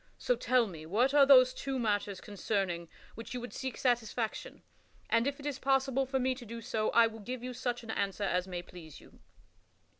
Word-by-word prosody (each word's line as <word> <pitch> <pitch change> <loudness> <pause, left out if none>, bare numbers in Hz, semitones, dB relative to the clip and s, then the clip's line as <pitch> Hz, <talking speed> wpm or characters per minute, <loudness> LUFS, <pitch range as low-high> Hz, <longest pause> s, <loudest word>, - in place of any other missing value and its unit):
So - - +1
tell 255 - +2
me 160 -6 -9
what 240 - +2
are 285 -2 +6
those 255 -2 +7
two 270 0 -3
matters 205 -4 -1
concerning 195 -4 -2 0.2
which 230 +2 -8
you - - -2
would 245 +1 -8
seek 260 -1 -5
satisfaction, 240 - -1 0.5
and, 230 +2 +3
if 280 0 -2
it 285 - -10
is 285 -3 -3
possible 270 0 +1
for 265 +1 0
me 260 0 +1
to 255 -1 -10
do 230 0 -7
so, 220 -1 -1
I 235 - +6
will 225 0 -5
give 245 +3 -6
you 250 0 -5
such 245 0 -3
an 225 - -5
answer 200 -1 -2
as 180 -1 0
may 175 -1 -5
please 170 -4 -12
you." - - -19
235 Hz, 210 wpm, -31 LUFS, 205-260 Hz, 0.5 s, those